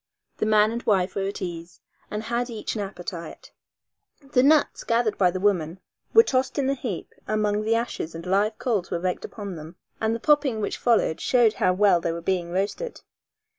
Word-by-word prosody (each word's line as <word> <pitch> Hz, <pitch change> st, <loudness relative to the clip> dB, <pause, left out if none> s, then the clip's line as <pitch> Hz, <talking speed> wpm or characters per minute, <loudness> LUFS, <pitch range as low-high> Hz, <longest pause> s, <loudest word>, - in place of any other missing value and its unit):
The 215 Hz, -, 0 dB
man 215 Hz, 0 st, +4 dB
and 235 Hz, +1 st, -3 dB
wife 190 Hz, -4 st, +1 dB
were 195 Hz, -1 st, -1 dB
at 200 Hz, 0 st, -5 dB
ease 170 Hz, -1 st, -7 dB, 0.3 s
and 210 Hz, +1 st, -4 dB
had 240 Hz, +2 st, -2 dB
each 225 Hz, -3 st, -4 dB
an 215 Hz, -, -3 dB
appetite. 175 Hz, -4 st, -7 dB, 0.8 s
The 250 Hz, -, +4 dB
nuts 295 Hz, +3 st, +3 dB
gathered 230 Hz, -2 st, +1 dB
by 185 Hz, -2 st, +3 dB
the 185 Hz, +1 st, -3 dB
woman 185 Hz, -3 st, 0 dB, 0.3 s
were 455 Hz, -, +8 dB
tossed 260 Hz, -, 0 dB
in 275 Hz, -2 st, +1 dB
a -, -, +2 dB
heap 245 Hz, -9 st, -5 dB
among 210 Hz, -1 st, +1 dB
the 220 Hz, +1 st, +1 dB
ashes 230 Hz, -8 st, -3 dB
and 165 Hz, +1 st, -7 dB
live 205 Hz, +4 st, +1 dB
coals 210 Hz, -8 st, -1 dB
were -, -, -1 dB
raked 180 Hz, +1 st, -2 dB
upon 200 Hz, -5 st, -7 dB
them, 160 Hz, +3 st, -10 dB, 0.3 s
and 220 Hz, +1 st, +1 dB
the -, -, -4 dB
popping 285 Hz, -3 st, +2 dB
which 205 Hz, -, -2 dB
followed 230 Hz, -9 st, +2 dB
showed 240 Hz, -4 st, +4 dB
how 185 Hz, -, +2 dB
well 190 Hz, -2 st, +4 dB
they 165 Hz, -, -1 dB
were 165 Hz, -, -4 dB
being 175 Hz, 0 st, -1 dB
roasted. 200 Hz, -, -3 dB
210 Hz, 200 wpm, -25 LUFS, 180-235 Hz, 0.8 s, were